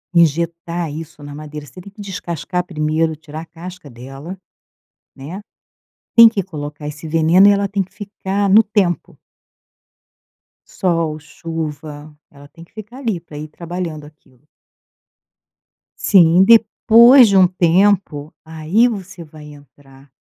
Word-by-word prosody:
injetar 170 +1 0
isso 155 -1 -10
na 145 0 -9
madeira. 150 0 -9
Você 145 +6 -14
tem 200 - -13
que 205 - -13
descascar 180 -2 -5
primeiro, 160 -1 -1
tirar 155 0 -10
a - - -10
casca 170 0 -11
dela, 135 +9 -10 0.8
né, 155 +9 -8 0.8
tem 230 -1 +10
que 215 -3 -3
colocar 150 -4 -8
esse 150 +2 -9
veneno 165 +5 +4
e - - +6
ela 200 0 0
tem 195 0 -1
que 190 - -26
ficar 200 -1 -3
no 215 +3 +7
tempo. 200 -5 -2 1.5
Sol, 165 -4 -2
chuva, 155 -2 -8 0.2
ela 140 0 -16
tem 165 +3 -16
que 170 - -22
ficar 220 +3 -11
ali 230 -9 -3
pra 155 -3 -13
ir 150 +1 -7
trabalhando 170 -1 -6
aquilo. 145 -2 -22 1.5
Sim, 175 -2 +5
depois 230 +3 +6
de 195 - +3
um 185 -1 +6
tempo, 175 -3 +1
aí 160 +9 +1
você 195 -6 -7
vai 155 -1 -14
entrar 135 -1 -20
165 Hz, 135 wpm, -17 LUFS, 150-195 Hz, 1.5 s, tem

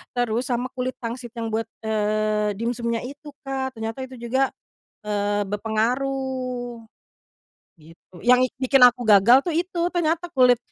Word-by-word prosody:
terus 245 +1 0
sama 250 0 -2
kulit 255 0 -3
pangsit 240 0 -6
yang 225 -1 -4
buat, 225 0 -1 0.2
eee, 215 -1 0
dimsumnya 235 0 -2
itu 285 +2 -10
Kak 265 -1 -3
ternyata 225 +2 -5
itu 260 - -11
juga, 250 +3 0 0.6
eee, 205 0 0
berpengaruh, 245 +3 -2 0.9
gitu 165 +3 -20
yang 250 +1 +6
ik 255 - +1
bikin 265 +1 +2
aku 245 0 -4
gagal 220 +6 +6
tuh 345 - -1
itu 345 +2 -1
ternyata 340 0 -1
kulit, 250 -4 +5
245 Hz, 140 wpm, -23 LUFS, 220-265 Hz, 0.9 s, yang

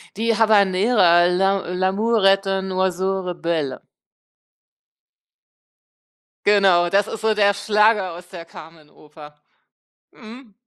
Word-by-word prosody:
Die 230 +2 -1
Habanera, 200 -4 +2
L'a 190 0 -1
l'amour 195 +4 -1
est 195 0 +2
un 190 0 -3
oiseau 190 +1 -2
rebelle. 165 -6 -4 2.6
Genau, 195 -4 +3
das 200 +2 +1
ist 225 - -8
so 220 0 +1
der 200 -1 +1
Schlager 210 -1 +1
aus 175 +1 -13
der 170 -3 -11
Carmen-Oper, 155 -2 -16 0.8
mhm. 230 -1 -15
195 Hz, 100 wpm, -20 LUFS, 175-210 Hz, 2.6 s, Genau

